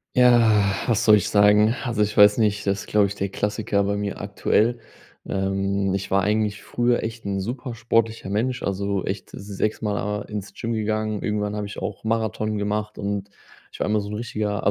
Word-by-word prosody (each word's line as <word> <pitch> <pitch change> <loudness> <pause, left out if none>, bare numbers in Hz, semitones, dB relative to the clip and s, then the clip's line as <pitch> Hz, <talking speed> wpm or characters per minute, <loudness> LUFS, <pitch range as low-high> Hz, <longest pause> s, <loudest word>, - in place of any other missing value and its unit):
Ja, 115 -5 +5
was 115 -1 +1
soll 105 -1 +7
ich 100 - -1
sagen? 105 +2 +5
Also, 120 -4 -1
ich 105 +1 0
weiß 105 +2 +7
nicht, 105 -2 +1
das 100 0 -1
glaube 105 -1 +3
ich, 100 - -3
der 100 0 -2
Klassiker 105 0 -1
bei 100 +1 0
mir 100 -1 -3
aktuell. 105 +4 +1 0.5
Ähm, 95 0 0
ich 100 0 -3
war 95 0 +2
eigentlich 105 0 0
früher 120 0 0
echt 115 +1 -6
'n 100 -1 -1
super 120 +4 -5
sportlicher 115 -3 0
Mensch, 125 +5 -1
also, 100 0 -1
echt 95 0 -4
sechsmal 105 +1 -2
a 105 0 -2
ins 100 -2 -7
Gym 115 +3 -3
gegangen. 110 -1 -1
Irgendwann 105 -1 -1
habe 105 -1 -3
ich 100 - -9
auch 100 -2 -5
Marathon 110 -1 -1
gemacht 105 +1 -2
und 100 0 -3 0.4
ich - - -12
war - - 0
immer 105 0 +1
so 100 - -6
'n 105 - -4
richtiger 105 -3 -3
105 Hz, 190 wpm, -23 LUFS, 100-110 Hz, 0.5 s, soll